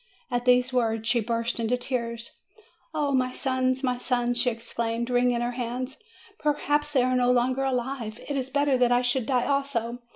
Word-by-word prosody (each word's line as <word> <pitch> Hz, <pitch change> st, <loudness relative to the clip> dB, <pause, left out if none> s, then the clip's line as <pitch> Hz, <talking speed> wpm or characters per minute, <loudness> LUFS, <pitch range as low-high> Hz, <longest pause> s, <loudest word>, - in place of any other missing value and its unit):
At 245 Hz, 0 st, -1 dB
these 250 Hz, +1 st, +4 dB
words 225 Hz, -3 st, 0 dB
she 235 Hz, +1 st, +3 dB
burst 230 Hz, +1 st, -2 dB
into 230 Hz, +2 st, +1 dB
tears. 235 Hz, -2 st, -3 dB, 0.6 s
"O 300 Hz, -3 st, 0 dB
my 255 Hz, -1 st, +1 dB
sons! 260 Hz, 0 st, 0 dB
my 250 Hz, -1 st, 0 dB
sons!" 245 Hz, -1 st, 0 dB
she 250 Hz, -, +3 dB
exclaimed, 230 Hz, +1 st, -3 dB
wringing 245 Hz, -1 st, +2 dB
her 240 Hz, 0 st, -1 dB
hands; 250 Hz, +2 st, -4 dB, 0.4 s
"perhaps 295 Hz, 0 st, +1 dB
they 260 Hz, -3 st, +4 dB
are 255 Hz, 0 st, +1 dB
no 250 Hz, 0 st, +3 dB
longer 255 Hz, +2 st, +2 dB
alive! 250 Hz, -4 st, -2 dB
It 285 Hz, -, -2 dB
is 265 Hz, -1 st, -2 dB
better 285 Hz, -2 st, +2 dB
that 245 Hz, -1 st, +4 dB
I 245 Hz, +1 st, +3 dB
should 245 Hz, -1 st, +1 dB
die 250 Hz, -3 st, +2 dB
also. 270 Hz, -4 st, -1 dB
250 Hz, 185 wpm, -26 LUFS, 240-265 Hz, 0.6 s, these